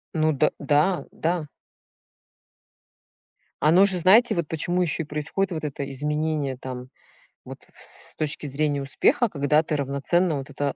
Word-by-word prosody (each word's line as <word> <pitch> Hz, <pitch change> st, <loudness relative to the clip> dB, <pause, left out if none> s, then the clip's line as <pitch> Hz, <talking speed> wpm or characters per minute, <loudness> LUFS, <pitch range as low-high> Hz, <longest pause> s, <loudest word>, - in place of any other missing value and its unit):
Ну 155 Hz, 0 st, +2 dB
д 140 Hz, -, +2 dB
да, 150 Hz, +6 st, +1 dB
да. 165 Hz, -2 st, -2 dB, 2.1 s
Оно 175 Hz, +6 st, +6 dB
же 190 Hz, -2 st, +2 dB
знаете, 195 Hz, +8 st, +5 dB
вот 170 Hz, -3 st, -1 dB
почему 175 Hz, +3 st, 0 dB
ещё 165 Hz, -1 st, 0 dB
и -, -, -11 dB
происходит 150 Hz, +6 st, -2 dB
вот 160 Hz, -2 st, -4 dB
это 140 Hz, -2 st, -4 dB
изменение 150 Hz, -1 st, -2 dB
там 125 Hz, -1 st, -7 dB, 0.6 s
вот -, -, -9 dB
в -, -, -17 dB
с -, -, -8 dB
точки 150 Hz, 0 st, -2 dB
зрения 145 Hz, 0 st, -1 dB
успеха, 240 Hz, -, +2 dB
когда 150 Hz, -1 st, +2 dB
ты 155 Hz, -, -2 dB
равноценно 145 Hz, +5 st, 0 dB
вот 135 Hz, +1 st, -7 dB
это 140 Hz, -1 st, -3 dB
150 Hz, 150 wpm, -24 LUFS, 140-175 Hz, 2.1 s, Оно